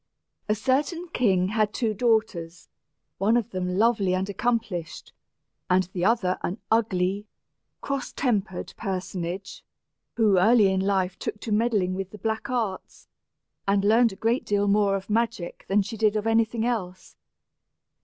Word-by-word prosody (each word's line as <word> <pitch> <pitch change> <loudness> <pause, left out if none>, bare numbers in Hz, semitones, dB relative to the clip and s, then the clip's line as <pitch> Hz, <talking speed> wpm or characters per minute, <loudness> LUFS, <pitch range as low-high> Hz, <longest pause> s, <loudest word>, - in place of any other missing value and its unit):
] - - -46
A 210 - +3
certain 290 - 0
king 190 - +2
had 215 0 0
two 225 -3 0
daughters, 215 -7 -1 0.5
one 215 +5 +3
of 235 - -2
them 180 0 -2
lovely 210 -4 +3
and 190 +1 -1
accomplished, 205 -6 -3 0.6
and 185 +1 +4
the 175 - -2
other 195 -3 +2
an 180 - -3
ugly, 205 -2 +1 0.5
cross 275 -1 -3
tempered 210 -8 -2
personage, 185 -2 -4 0.5
who 210 -5 +4
early 210 0 +5
in 190 - +1
life 190 -1 0
took 210 - -4
to 225 - -5
meddling 210 -4 +1
with 190 0 -4
the 210 - -11
black 220 +4 -3
arts, 225 -7 -4 0.6
and 200 0 +2
learned 225 +2 +5
a - - -9
great 230 +5 0
deal 205 0 +1
more 200 -1 +3
of 195 0 -5
magic 225 -5 -2
than 200 +1 +3
she 210 +3 -7
did 215 -1 +2
of 210 0 -1
any 225 0 +4
thing 230 0 -3
else. 185 -7 -4
205 Hz, 155 wpm, -25 LUFS, 190-225 Hz, 0.6 s, early